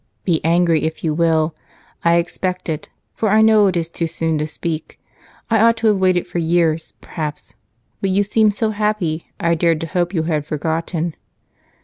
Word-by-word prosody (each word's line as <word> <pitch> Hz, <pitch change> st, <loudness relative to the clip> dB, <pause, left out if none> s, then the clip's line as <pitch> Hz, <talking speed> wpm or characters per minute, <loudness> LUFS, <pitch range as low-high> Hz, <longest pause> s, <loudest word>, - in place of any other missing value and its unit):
"Be 170 Hz, -4 st, +1 dB
angry, 165 Hz, -1 st, +3 dB
if 160 Hz, -, -4 dB
you 160 Hz, -2 st, +1 dB
will. 160 Hz, -1 st, +2 dB, 0.5 s
I 170 Hz, 0 st, +4 dB
expect 180 Hz, +1 st, -2 dB
it, 155 Hz, -1 st, -4 dB, 0.2 s
for 220 Hz, -, 0 dB
I 215 Hz, +2 st, +5 dB
know 215 Hz, -2 st, +5 dB
it 185 Hz, -2 st, 0 dB
is 165 Hz, -1 st, -1 dB
too 170 Hz, 0 st, -3 dB
soon 160 Hz, -1 st, -1 dB
to 155 Hz, -, -1 dB
speak. 160 Hz, 0 st, -5 dB, 0.5 s
I 225 Hz, -1 st, +2 dB
ought 230 Hz, +1 st, +4 dB
to 220 Hz, -2 st, +3 dB
wait 185 Hz, -2 st, +2 dB
for 175 Hz, -, -4 dB
years, 165 Hz, -1 st, +1 dB
perhaps, 150 Hz, -2 st, -6 dB, 0.5 s
but 195 Hz, -, 0 dB
you 195 Hz, +2 st, +2 dB
seemed 210 Hz, 0 st, +2 dB
so 220 Hz, 0 st, 0 dB
happy 205 Hz, -7 st, -1 dB
I 170 Hz, -1 st, +2 dB
dared 165 Hz, -1 st, +2 dB
to -, -, -2 dB
hope 175 Hz, +1 st, -1 dB
you 160 Hz, -, +1 dB
had 155 Hz, -3 st, -1 dB
forgotten." 160 Hz, +2 st, -2 dB
170 Hz, 185 wpm, -19 LUFS, 160-195 Hz, 0.5 s, I